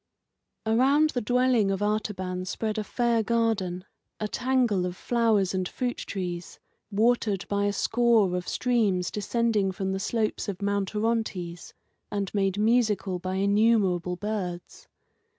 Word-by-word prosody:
Around 275 Hz, +7 st, +3 dB
the 245 Hz, -, -2 dB
dwelling 245 Hz, -2 st, +2 dB
of 195 Hz, +1 st, -1 dB
Artaban 190 Hz, -4 st, -2 dB
spread 215 Hz, +3 st, -2 dB
a -, -, -2 dB
fair 235 Hz, +1 st, +1 dB
garden, 215 Hz, -5 st, 0 dB, 0.3 s
a 215 Hz, -, -1 dB
tangle 240 Hz, -6 st, +1 dB
of 180 Hz, -, -5 dB
flowers 225 Hz, -6 st, +1 dB
and 185 Hz, -1 st, -1 dB
fruit 245 Hz, -1 st, -3 dB
trees, 175 Hz, -3 st, -5 dB, 0.3 s
watered 215 Hz, -2 st, +1 dB
by 200 Hz, 0 st, 0 dB
a 205 Hz, -, +2 dB
score 220 Hz, -3 st, +2 dB
of 180 Hz, 0 st, -3 dB
streams 210 Hz, -8 st, +1 dB
descending 215 Hz, -2 st, 0 dB
from 190 Hz, 0 st, -3 dB
the 190 Hz, -, -2 dB
slopes 215 Hz, +1 st, -1 dB
of 190 Hz, -2 st, -4 dB
Mount 200 Hz, 0 st, -1 dB
Orontes, 210 Hz, -6 st, -2 dB, 0.3 s
and 200 Hz, -2 st, -3 dB
made 195 Hz, -1 st, +1 dB
musical 210 Hz, -4 st, +1 dB
by 185 Hz, +1 st, -3 dB
innumerable 200 Hz, -3 st, +2 dB
birds. 185 Hz, -3 st, -5 dB
205 Hz, 135 wpm, -27 LUFS, 190-230 Hz, 0.3 s, Around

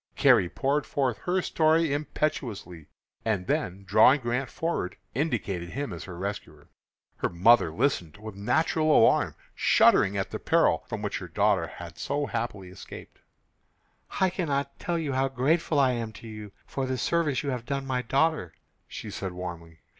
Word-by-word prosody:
Carrie 90 Hz, -, +5 dB
poured 140 Hz, +7 st, -1 dB
forth 130 Hz, -5 st, -1 dB
her 180 Hz, +1 st, +1 dB
story 160 Hz, -1 st, +2 dB
impetuously, 115 Hz, -, -3 dB, 0.4 s
and 105 Hz, -5 st, -1 dB
then 95 Hz, +1 st, -2 dB
drawing 110 Hz, +8 st, +5 dB
Grant 125 Hz, +1 st, -2 dB
forward, 165 Hz, -, -3 dB, 0.2 s
indicated 105 Hz, -, -2 dB
him 140 Hz, -4 st, -4 dB
as 85 Hz, -, -7 dB
her 90 Hz, -2 st, -8 dB
rescuer. 100 Hz, +3 st, -6 dB, 0.5 s
Her -, -, -1 dB
mother 90 Hz, 0 st, +4 dB
listened 105 Hz, -, -1 dB
with 110 Hz, 0 st, -8 dB
natural 155 Hz, +10 st, +1 dB
alarm, -, -, +4 dB, 0.2 s
shuddering 100 Hz, +1 st, +4 dB
at 95 Hz, 0 st, -2 dB
the -, -, -4 dB
peril -, -, +2 dB
from -, -, -5 dB
which -, -, -2 dB
her -, -, -7 dB
daughter 100 Hz, -5 st, +1 dB
had 85 Hz, -1 st, -10 dB
so 145 Hz, +1 st, -1 dB
happily 115 Hz, -7 st, -4 dB
escaped. 95 Hz, -, -11 dB, 1.0 s
"I 190 Hz, -1 st, +3 dB
cannot 140 Hz, -6 st, -2 dB
tell 170 Hz, -1 st, -1 dB
how 135 Hz, +1 st, +2 dB
grateful 145 Hz, +4 st, +1 dB
I 135 Hz, -2 st, +4 dB
am 115 Hz, -2 st, -3 dB
to 115 Hz, -, -11 dB
you 105 Hz, -2 st, -8 dB
for 135 Hz, -1 st, -3 dB
the 130 Hz, 0 st, -1 dB
service 155 Hz, -2 st, 0 dB
you 140 Hz, -, -1 dB
have 125 Hz, -2 st, -5 dB
done 140 Hz, -1 st, -2 dB
my 130 Hz, -1 st, -1 dB
daughter," 135 Hz, -, 0 dB, 0.3 s
she -, -, -7 dB
said, 95 Hz, -2 st, -5 dB
warmly. 85 Hz, -3 st, -8 dB
120 Hz, 160 wpm, -27 LUFS, 95-145 Hz, 1.0 s, Carrie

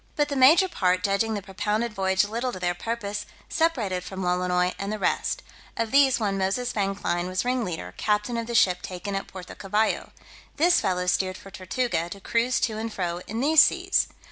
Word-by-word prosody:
But 295 Hz, -1 st, +1 dB
the 285 Hz, -, -2 dB
major 295 Hz, +8 st, +6 dB
part 185 Hz, -, 0 dB
judging 205 Hz, +2 st, +1 dB
the 200 Hz, -, -4 dB
propounded 210 Hz, +4 st, -2 dB
voyage 190 Hz, -1 st, +2 dB
little 235 Hz, +5 st, -2 dB
to -, -, -6 dB
their 175 Hz, -1 st, 0 dB
purpose, 210 Hz, +1 st, -4 dB, 0.2 s
separated 230 Hz, -, 0 dB
from 190 Hz, +1 st, -6 dB
Lolonois 180 Hz, 0 st, +1 dB
and 195 Hz, +1 st, -3 dB
the 215 Hz, -, -2 dB
rest: -, -, -1 dB, 0.3 s
of 230 Hz, -1 st, -1 dB
these 270 Hz, -2 st, +5 dB
one 200 Hz, -3 st, -1 dB
Moses 195 Hz, +6 st, -1 dB
Vanclein 195 Hz, -3 st, -1 dB
was 185 Hz, +4 st, -2 dB
ringleader, 235 Hz, -10 st, -2 dB
captain 210 Hz, +3 st, 0 dB
of 230 Hz, -1 st, -3 dB
the 235 Hz, -, -3 dB
ship 180 Hz, -5 st, +4 dB
taken 185 Hz, +2 st, -6 dB
at 195 Hz, -, -3 dB
Puerto 185 Hz, -2 st, -9 dB
Cavallo: 210 Hz, +3 st, -1 dB, 0.5 s
this 345 Hz, +4 st, +4 dB
fellow 180 Hz, -1 st, 0 dB
steered 185 Hz, +1 st, 0 dB
for 195 Hz, -, -13 dB
Tortuga, 185 Hz, -2 st, -2 dB
to 200 Hz, -, -8 dB
cruise 235 Hz, +4 st, +1 dB
to 220 Hz, -3 st, -1 dB
and 225 Hz, 0 st, -4 dB
fro 175 Hz, -3 st, -3 dB
in 225 Hz, +3 st, -3 dB
these 305 Hz, +2 st, +7 dB
seas. -, -, +2 dB
205 Hz, 195 wpm, -25 LUFS, 185-235 Hz, 0.5 s, these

